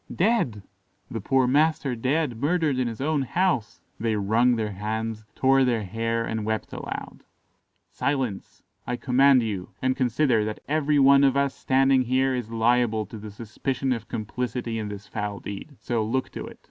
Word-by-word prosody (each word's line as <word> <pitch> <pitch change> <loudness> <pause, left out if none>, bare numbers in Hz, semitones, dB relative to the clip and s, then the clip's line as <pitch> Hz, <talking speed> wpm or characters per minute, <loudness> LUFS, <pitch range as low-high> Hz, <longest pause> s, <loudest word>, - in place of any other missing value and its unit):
"Dead! 175 - +1 0.5
the 115 - -4
poor 130 +5 +2
master 145 0 +2
dead, 130 +1 0
murdered 150 0 +1
in 125 - +1
his 115 -2 -5
own 150 +1 +1
house." 130 - 0 0.2
They 110 -1 0
wrung 110 +5 +3
their 110 -2 -2
hands, 110 +2 -4
tore 135 0 +4
their 120 -4 +1
hair, 115 +3 -2
and 110 -1 -3
wept 110 0 -3
aloud. - - -6 0.7
"Silence! 130 -8 -3 0.2
I 125 - -1
command 130 0 +4
you; 100 -5 -4
and 130 0 +1
consider 125 -2 +2
that 105 0 -4
every 150 0 +1
one 140 0 +6
of 135 0 +4
us 140 -1 +1
standing 135 0 +3
here 130 +2 +1
is 125 -3 -3
liable 115 -1 +2
to 110 - -9
the 105 +1 -8
suspicion 125 +5 -2
of 115 -2 -6
complicity 120 +1 -3
in 105 - -3
this 105 0 -8
foul 105 -2 -4
deed; 100 +9 -8
so 115 -3 -1
look 130 +4 -1
to - - -6
it. - - -11
120 Hz, 170 wpm, -25 LUFS, 110-135 Hz, 0.7 s, one